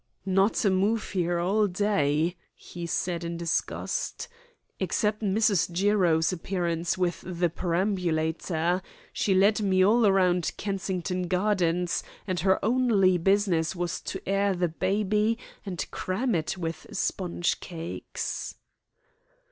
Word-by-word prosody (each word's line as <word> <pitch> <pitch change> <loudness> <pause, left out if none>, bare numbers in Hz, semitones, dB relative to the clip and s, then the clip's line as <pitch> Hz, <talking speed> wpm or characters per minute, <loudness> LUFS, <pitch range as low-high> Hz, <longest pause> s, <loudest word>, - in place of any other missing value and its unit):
"Not 195 +3 +2
a 200 - +4
move 205 +4 +1
here 175 -2 0
all 200 +5 +2
day," 175 -4 +1 0.2
he 175 -1 -8
said 170 0 -1
in 170 0 -4
disgust, 170 - -2 0.5
"except 210 0 0
Mrs. 205 -3 +2
Jiro's 180 -3 +2
appearance 175 -1 -1
with 180 -2 -1
the 175 -1 -1
perambulator. 170 -1 0 0.3
She 195 - +1
led 205 +3 +4
me 185 -2 +3
all 215 0 +5
round 180 -3 +2
Kensington 185 -2 -2
Gardens, 180 -2 +1 0.2
and 185 -3 -2
her 190 +3 +3
only 215 -7 +3
business 190 -3 +2
was 175 -1 -3
to 190 - -6
air 195 0 +2
the 175 -1 0
baby 210 +5 +1 0.3
and 180 -3 -3
cram 235 +7 -1
it 165 +2 -1
with 165 -2 -5
sponge 175 -1 -1
cakes." 170 -1 -5
185 Hz, 120 wpm, -27 LUFS, 170-200 Hz, 0.5 s, all